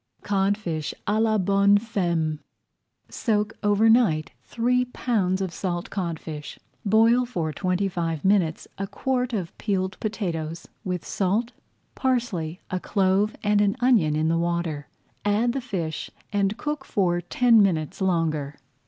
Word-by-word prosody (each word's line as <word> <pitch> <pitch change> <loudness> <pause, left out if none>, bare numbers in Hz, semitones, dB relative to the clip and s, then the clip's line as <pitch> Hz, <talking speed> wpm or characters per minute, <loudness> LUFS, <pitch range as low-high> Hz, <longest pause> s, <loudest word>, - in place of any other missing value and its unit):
CODFISH 195 -6 -1
À 215 +1 +1
LA 220 -1 +3
BONNE 200 +1 +4
FEMME 170 -8 -1 0.7
Soak 215 -2 -1
over 205 +1 +3
night 220 -10 +3
three 250 +2 +1
pounds 205 -7 0
of 185 -3 -3
salt 175 -2 -3
codfish. 160 -5 -4
[Page - - -25 0.3
102] - - -1
Boil 230 +4 +5
for 165 -10 -2
twenty 185 +4 0
five 165 -4 -3
minutes 190 -5 +2
a 195 - -2
quart 250 +4 -1
of 190 -7 -3
peeled 190 -3 -1
potatoes, 170 -7 -3 0.2
with 180 -4 -3
salt, 210 +5 0 0.4
parsley, 205 -11 -1
a 185 - 0
clove, 195 +2 +1
and 205 0 +3
an 205 -1 +2
onion 225 -12 +3
in 155 +1 +1
the 165 +1 +2
water. 170 -4 -2 0.4
Add 215 +4 +2
the 270 - -2
fish 175 -10 -4 0.2
and 200 +1 +1
cook 295 +1 -3
for 175 -7 0
ten 230 +5 +4
minutes 165 -4 0
longer. 160 -6 0
195 Hz, 145 wpm, -25 LUFS, 170-220 Hz, 0.7 s, Boil